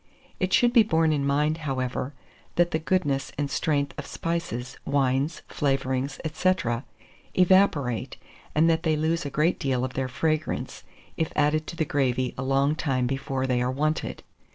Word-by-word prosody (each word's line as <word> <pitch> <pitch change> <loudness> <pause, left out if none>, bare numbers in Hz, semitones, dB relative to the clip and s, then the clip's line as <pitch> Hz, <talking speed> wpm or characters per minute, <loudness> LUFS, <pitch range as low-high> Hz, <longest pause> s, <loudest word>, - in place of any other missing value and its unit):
It 185 -1 0
should 240 +3 +4
be 235 - +8
borne 160 -7 +2
in 140 -2 0
mind, 150 +3 +1
however, 130 -2 -3 0.4
that 175 0 +3
the 160 - +1
goodness 160 -5 0
and 145 -1 -2
strength 145 -4 0
of - - -6
spices, 165 -7 -3
wines, 140 +2 0
flavourings, 135 -1 -1
&c., 185 +4 +3 0.8
evaporate, 180 - +3 0.4
and 155 +2 +5
that 165 -1 +3
they 160 -2 +1
lose 160 0 0
a - - -3
great 155 +5 +1
deal 130 -2 0
of 130 - -6
their 130 -1 -1
fragrance, 155 +4 -2 0.3
if 160 - -1
added 150 +1 +2
to - - -6
the 160 - 0
gravy 130 -3 0
a - - -5
long 135 +2 +2
time 135 -6 0
before 135 0 -2
they 125 -2 +1
are 125 - +1
wanted. 155 +4 -1
145 Hz, 165 wpm, -26 LUFS, 130-160 Hz, 0.8 s, be